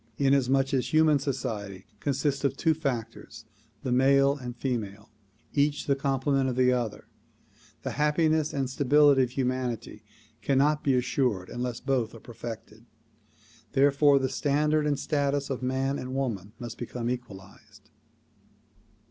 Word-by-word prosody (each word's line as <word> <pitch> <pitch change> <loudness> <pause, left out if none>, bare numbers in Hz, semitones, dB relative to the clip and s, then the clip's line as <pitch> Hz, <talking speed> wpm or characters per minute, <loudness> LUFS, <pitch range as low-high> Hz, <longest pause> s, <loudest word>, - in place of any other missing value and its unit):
Inasmuch 135 -1 +2
as 130 +2 0
human 155 -2 +4
society 105 -9 -4
consists 140 +1 -1
of 135 -1 0
two 160 +1 +2
factors, 120 -5 -5 0.4
the 130 - -2
male 140 +2 +4
and 125 -4 -7
female, 110 -5 -4 0.4
each 145 0 +1
the 140 - +2
complement 135 0 0
of 125 - -3
the 125 0 +3
other, 115 -4 -3 0.8
the - - -3
happiness 155 +1 +1
and 135 -2 -1
stability 140 +1 +4
of 125 -1 -1
hu 130 -1 0
manity 125 -4 -3 0.4
cannot 145 +2 +2
be 135 -2 +2
assured 125 -6 0
unless 120 -1 -4
both 125 -5 -1
are - - -10
perfected. 115 -1 -9 0.9
Therefore 140 +1 +4
the 135 -1 +1
standard 150 +2 +1
and 145 -1 +1
status 140 -1 -1
of 130 - -3
man 135 +2 -1
and 130 +1 -5
woman 110 -7 -3
must 120 -1 -8
become 120 0 -4
equalized. 120 -6 -8
135 Hz, 140 wpm, -27 LUFS, 120-140 Hz, 0.9 s, human